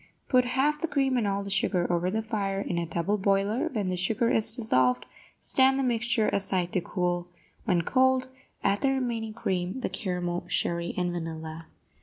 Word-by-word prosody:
Put 250 Hz, -2 st, +4 dB
half 275 Hz, +4 st, +1 dB
the 330 Hz, -, 0 dB
cream 270 Hz, -4 st, +1 dB
and 235 Hz, -4 st, +1 dB
all 200 Hz, 0 st, -1 dB
the 200 Hz, -, -5 dB
sugar 195 Hz, -2 st, +1 dB
over 175 Hz, +1 st, +1 dB
the 220 Hz, +3 st, -1 dB
fire 200 Hz, -3 st, -2 dB
in 175 Hz, -3 st, -2 dB
a 170 Hz, -, -3 dB
double 170 Hz, +6 st, -1 dB
boiler; 200 Hz, +4 st, +1 dB
when 210 Hz, -7 st, -1 dB
the 185 Hz, -, -1 dB
sugar 220 Hz, +6 st, +1 dB
is 220 Hz, 0 st, +4 dB
dissolved, 130 Hz, -, +2 dB, 0.3 s
stand 265 Hz, 0 st, +3 dB
the 270 Hz, -, 0 dB
mixture 235 Hz, -2 st, +1 dB
aside 185 Hz, -3 st, 0 dB
to 185 Hz, -, +2 dB
cool; 175 Hz, 0 st, -2 dB, 0.4 s
when 180 Hz, -6 st, +2 dB
cold, 260 Hz, +3 st, +2 dB, 0.3 s
add 200 Hz, +1 st, +1 dB
the 275 Hz, -, +3 dB
remaining 235 Hz, -5 st, -2 dB
cream, 185 Hz, +4 st, -2 dB
the -, -, -1 dB
caramel, 180 Hz, -4 st, -3 dB
sherry 170 Hz, 0 st, -1 dB
and 180 Hz, -1 st, 0 dB
vanilla. 160 Hz, -1 st, -6 dB
200 Hz, 185 wpm, -27 LUFS, 175-240 Hz, 0.4 s, Put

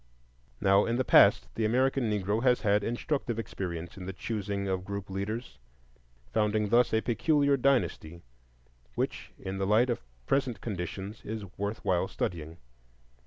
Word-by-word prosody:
Now 100 Hz, +1 st, +4 dB
in 115 Hz, -, 0 dB
the 130 Hz, +1 st, 0 dB
past -, -, +6 dB
the 115 Hz, -, -2 dB
American 130 Hz, +2 st, +2 dB
Negro 105 Hz, +1 st, 0 dB
has 125 Hz, -1 st, +3 dB
had 105 Hz, -1 st, +2 dB
instructive 120 Hz, +1 st, -2 dB
experience 90 Hz, -6 st, -5 dB
in 90 Hz, -1 st, -7 dB
the 95 Hz, -, -4 dB
choosing 100 Hz, -1 st, -3 dB
of 95 Hz, -1 st, -1 dB
group 100 Hz, 0 st, -6 dB
leaders, 100 Hz, -, -4 dB, 0.7 s
founding 105 Hz, -1 st, +1 dB
thus 120 Hz, +3 st, +4 dB
a 110 Hz, -, +2 dB
peculiar 140 Hz, +4 st, +2 dB
dynasty 120 Hz, -11 st, 0 dB, 0.7 s
which -, -, -3 dB
in 95 Hz, 0 st, -5 dB
the 95 Hz, -, 0 dB
light 115 Hz, +5 st, +4 dB
of 120 Hz, -, -2 dB, 0.2 s
present 130 Hz, -, 0 dB
conditions 100 Hz, +1 st, -5 dB
is 110 Hz, -1 st, -5 dB
worth 100 Hz, +2 st, -4 dB
while 90 Hz, -2 st, +2 dB
studying. 80 Hz, -1 st, -4 dB
105 Hz, 150 wpm, -29 LUFS, 95-120 Hz, 0.7 s, past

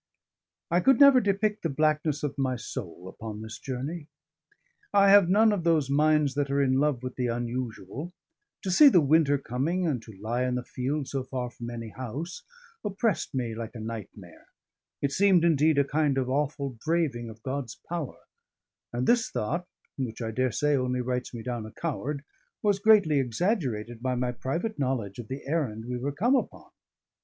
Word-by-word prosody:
I 175 Hz, -, +4 dB
could 265 Hz, +7 st, +4 dB
never 280 Hz, -3 st, +8 dB
depict 205 Hz, +1 st, 0 dB
the 165 Hz, -, -1 dB
blackness 155 Hz, 0 st, +1 dB
of 145 Hz, -, -2 dB
my 130 Hz, -1 st, +1 dB
soul 95 Hz, -7 st, -7 dB
upon 105 Hz, +2 st, -7 dB
this 110 Hz, 0 st, -8 dB
journey. 145 Hz, +5 st, -5 dB, 0.8 s
I 200 Hz, -1 st, +6 dB
have 200 Hz, -3 st, +7 dB
none 215 Hz, +3 st, +5 dB
of 200 Hz, -5 st, -1 dB
those 155 Hz, -5 st, +2 dB
minds 150 Hz, -1 st, +3 dB
that 145 Hz, 0 st, -1 dB
are 140 Hz, +1 st, +1 dB
in 135 Hz, -1 st, +3 dB
love 145 Hz, -4 st, +1 dB
with 130 Hz, -1 st, -6 dB
the 125 Hz, -1 st, 0 dB
unusual: 120 Hz, -, -4 dB, 0.5 s
to 190 Hz, -, -1 dB
see 285 Hz, +11 st, +8 dB
the 185 Hz, -, +5 dB
winter 145 Hz, -1 st, +4 dB
coming 140 Hz, +8 st, -1 dB
and 140 Hz, -8 st, 0 dB
to 110 Hz, -4 st, -13 dB
lie 115 Hz, +4 st, -2 dB
in 125 Hz, -1 st, 0 dB
the 125 Hz, -, -2 dB
field 135 Hz, +4 st, -3 dB
so 135 Hz, -2 st, -3 dB
far 125 Hz, -2 st, -4 dB
from 120 Hz, -1 st, -7 dB
any 115 Hz, -1 st, -6 dB
house, 130 Hz, -, -6 dB, 0.4 s
oppressed 205 Hz, -, -1 dB
me 120 Hz, -3 st, -1 dB
like 115 Hz, +1 st, -6 dB
a -, -, -6 dB
nightmare; 105 Hz, -5 st, -8 dB, 0.6 s
it 140 Hz, -, +1 dB
seemed, 185 Hz, -1 st, +4 dB
indeed, 155 Hz, -2 st, +3 dB
a 140 Hz, -, +5 dB
kind 145 Hz, -1 st, +1 dB
of 130 Hz, -2 st, 0 dB
awful 140 Hz, -1 st, -1 dB
braving 150 Hz, -8 st, 0 dB
of 110 Hz, 0 st, -13 dB
God's 130 Hz, -3 st, -4 dB
power; 165 Hz, -6 st, -4 dB, 0.7 s
and 120 Hz, +1 st, -1 dB
this 240 Hz, -1 st, +3 dB
thought, 170 Hz, +11 st, -2 dB, 0.3 s
which 120 Hz, -4 st, -3 dB
I 115 Hz, -2 st, -3 dB
daresay 130 Hz, +4 st, +1 dB
only 125 Hz, -1 st, 0 dB
writes 125 Hz, 0 st, -2 dB
me 115 Hz, -2 st, -7 dB
down 120 Hz, -2 st, -3 dB
a -, -, -11 dB
coward, 145 Hz, -2 st, -4 dB, 0.4 s
was 205 Hz, -2 st, +2 dB
greatly 200 Hz, -9 st, +5 dB
exaggerated 120 Hz, -, -1 dB
by 130 Hz, 0 st, 0 dB
my 125 Hz, 0 st, 0 dB
private 165 Hz, -, -3 dB
knowledge 125 Hz, -7 st, -2 dB
of 115 Hz, -, -7 dB
the 135 Hz, +3 st, -6 dB
errand 135 Hz, -8 st, -2 dB
we 125 Hz, 0 st, -3 dB
were 140 Hz, +3 st, -2 dB
come 225 Hz, -, +2 dB
upon. -, -, -3 dB
135 Hz, 185 wpm, -27 LUFS, 120-165 Hz, 0.8 s, never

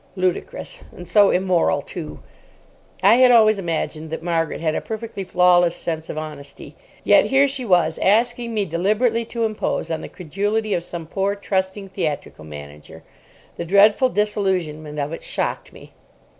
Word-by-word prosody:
Ludicrous. 185 Hz, -, -3 dB
And 175 Hz, -, -10 dB
so 205 Hz, +2 st, +5 dB
immoral, 180 Hz, -6 st, +1 dB
too. 165 Hz, -4 st, -8 dB, 0.8 s
I 235 Hz, -, +6 dB
had 255 Hz, 0 st, +6 dB
always 215 Hz, -3 st, +5 dB
imagined 160 Hz, -3 st, -3 dB
that 160 Hz, +1 st, -5 dB
Margaret 165 Hz, -2 st, -1 dB
had 160 Hz, -1 st, 0 dB
a -, -, -2 dB
perfectly 220 Hz, -2 st, -6 dB
flawless 180 Hz, -1 st, +3 dB
sense 160 Hz, -2 st, -4 dB
of -, -, -5 dB
honesty. 145 Hz, -3 st, -8 dB, 0.3 s
Yet -, -, +5 dB
here 270 Hz, +1 st, +4 dB
she 270 Hz, -2 st, -5 dB
was 180 Hz, -5 st, +2 dB
asking 235 Hz, +3 st, +1 dB
me 205 Hz, -2 st, 0 dB
deliberately 215 Hz, +7 st, 0 dB
to 230 Hz, 0 st, -2 dB
impose 215 Hz, -5 st, -2 dB
on 160 Hz, -, -2 dB
the -, -, -8 dB
credulity 205 Hz, +5 st, -2 dB
of 170 Hz, -, -1 dB
some 170 Hz, -1 st, -7 dB
poor, 195 Hz, +4 st, -1 dB
trusting 195 Hz, 0 st, -3 dB
theatrical 150 Hz, -, -4 dB
manager. 75 Hz, 0 st, -11 dB, 0.5 s
The -, -, -4 dB
dreadful 205 Hz, +7 st, +5 dB
disillusionment 185 Hz, -9 st, -1 dB
of 145 Hz, +2 st, -3 dB
it -, -, -6 dB
shocked -, -, -3 dB
me. -, -, -15 dB
185 Hz, 155 wpm, -21 LUFS, 165-215 Hz, 0.8 s, I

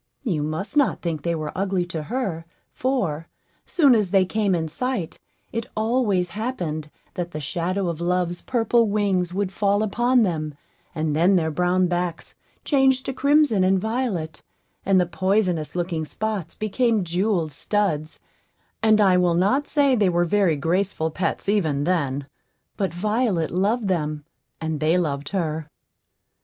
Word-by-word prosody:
You 180 Hz, -, -1 dB
must 155 Hz, -, -3 dB
not 285 Hz, -2 st, +2 dB
think 165 Hz, -4 st, -2 dB
they 170 Hz, +3 st, -1 dB
were 155 Hz, -2 st, -4 dB
ugly 190 Hz, -2 st, 0 dB
to 170 Hz, -3 st, -5 dB
her; 180 Hz, -, -3 dB, 0.3 s
for, 190 Hz, -, -1 dB, 0.4 s
soon 290 Hz, -7 st, +5 dB
as 210 Hz, -5 st, +2 dB
they 190 Hz, 0 st, +4 dB
came 200 Hz, -1 st, +1 dB
in 160 Hz, -2 st, -1 dB
sight, 195 Hz, +1 st, -3 dB, 0.3 s
it 230 Hz, +1 st, -3 dB
always 215 Hz, -6 st, +1 dB
happened 175 Hz, -, -3 dB, 0.2 s
that 175 Hz, -1 st, -4 dB
the 155 Hz, -, -4 dB
shadow 180 Hz, +5 st, -2 dB
of 170 Hz, -1 st, -3 dB
Love's 175 Hz, 0 st, 0 dB
purple 235 Hz, -1 st, +2 dB
wings 195 Hz, -4 st, +1 dB
would 195 Hz, 0 st, -2 dB
fall 200 Hz, +1 st, +1 dB
upon 240 Hz, +3 st, +2 dB
them, 155 Hz, -6 st, -2 dB, 0.4 s
and 155 Hz, -1 st, -1 dB
then 175 Hz, +5 st, +4 dB
their 160 Hz, -3 st, +1 dB
brown 180 Hz, +3 st, +2 dB
backs 175 Hz, -1 st, -3 dB, 0.3 s
changed 270 Hz, -2 st, +3 dB
to 265 Hz, -, -3 dB
crimson 280 Hz, -7 st, +3 dB
and 190 Hz, +1 st, +3 dB
violet, 220 Hz, -7 st, -2 dB, 0.5 s
and 195 Hz, -1 st, +5 dB
the 180 Hz, -, +3 dB
poisonous 180 Hz, -2 st, 0 dB
looking 170 Hz, -2 st, -2 dB
spots 210 Hz, -1 st, -4 dB
became 220 Hz, 0 st, +1 dB
jewelled 175 Hz, -1 st, 0 dB
studs; 160 Hz, -2 st, -1 dB, 0.6 s
and 220 Hz, -1 st, +4 dB
I 190 Hz, -3 st, +5 dB
will 175 Hz, -2 st, +3 dB
not 230 Hz, +12 st, +2 dB
say 285 Hz, -3 st, +3 dB
they 210 Hz, -6 st, +3 dB
were 175 Hz, 0 st, +2 dB
very 185 Hz, -2 st, +2 dB
graceful 165 Hz, +2 st, -1 dB
pets 185 Hz, +4 st, -2 dB
even 160 Hz, -9 st, +1 dB
then; 145 Hz, -5 st, 0 dB, 0.5 s
but 195 Hz, -2 st, -1 dB
Violet 210 Hz, -2 st, 0 dB
loved 205 Hz, +5 st, +1 dB
them, 155 Hz, -5 st, -1 dB, 0.3 s
and 160 Hz, -2 st, -3 dB
they 160 Hz, +3 st, +2 dB
loved 145 Hz, -5 st, -2 dB
her. 160 Hz, -5 st, -2 dB
185 Hz, 155 wpm, -23 LUFS, 165-215 Hz, 0.6 s, soon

